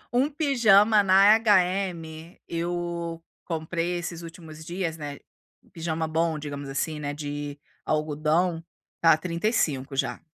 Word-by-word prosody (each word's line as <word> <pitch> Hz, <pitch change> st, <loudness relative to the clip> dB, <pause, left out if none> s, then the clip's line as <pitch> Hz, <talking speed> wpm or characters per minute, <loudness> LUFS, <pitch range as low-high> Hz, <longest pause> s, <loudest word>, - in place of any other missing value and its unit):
Um 260 Hz, +4 st, +3 dB
pijama 225 Hz, -8 st, +4 dB
na 195 Hz, +3 st, +7 dB
HM, 180 Hz, -6 st, 0 dB
eu 170 Hz, -1 st, -3 dB, 0.2 s
comprei 165 Hz, +1 st, -2 dB
esses 170 Hz, -1 st, -5 dB
últimos 160 Hz, -2 st, -10 dB
dias, 170 Hz, -1 st, -3 dB
né, 145 Hz, -2 st, -7 dB, 0.5 s
pijama 160 Hz, -1 st, -3 dB
bom, 160 Hz, 0 st, 0 dB
digamos 145 Hz, -2 st, -6 dB
assim, 150 Hz, +3 st, -2 dB
né, 145 Hz, -1 st, -4 dB
de 145 Hz, -1 st, -5 dB, 0.3 s
algodão, 155 Hz, +3 st, 0 dB, 0.4 s
está 165 Hz, -2 st, +5 dB
35, 160 Hz, -, -1 dB
já. 135 Hz, -, -1 dB
165 Hz, 115 wpm, -26 LUFS, 155-185 Hz, 0.5 s, na